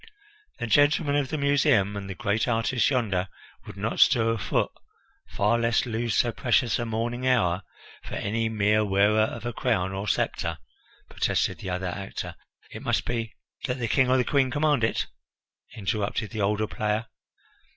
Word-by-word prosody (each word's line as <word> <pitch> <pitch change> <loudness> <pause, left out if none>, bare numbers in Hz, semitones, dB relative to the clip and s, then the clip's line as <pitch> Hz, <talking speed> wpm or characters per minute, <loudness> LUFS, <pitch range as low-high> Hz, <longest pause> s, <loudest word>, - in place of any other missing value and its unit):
"The - - -3
gentlemen 145 +3 +3
of 145 -2 +1
the 155 - -2
Museum 140 -8 +2
and 100 -1 -6
the 95 - -5
great 110 0 0
artists 115 +1 +1
yonder 105 -9 0 0.4
would - - -9
not - - -2
stir 115 -1 +5
a 115 - -1
foot, 90 - 0 0.6
far 105 +4 +1
less 115 -1 +2
lose 115 -1 -2
so 120 - +3
precious 125 0 +1
a 120 - -2
morning 120 +3 -2
hour, 95 -8 +2 0.4
for - - -6
any 115 +2 -1
mere 105 0 +2
wearer 105 +1 +3
of 110 +1 -2
a 120 - -3
crown 95 -2 0
or 95 +2 -4
sceptre," - - -1 0.5
protested - - 0
the 95 - -6
other 90 +1 -2
actor; 95 +2 -5 0.4
"it - - -8
must - - 0
be 115 -2 -3
" - - -10
"That 125 - -1
the 120 -2 -2
King 130 +2 +3
or 130 - +4
the 125 - +3
Queen 135 -1 +2
command 145 -2 +1
it," 115 - +1 0.7
interrupted 105 +1 -2
the 110 -2 -3
older 105 +2 +1
player. 105 0 -2
115 Hz, 175 wpm, -26 LUFS, 105-125 Hz, 0.7 s, stir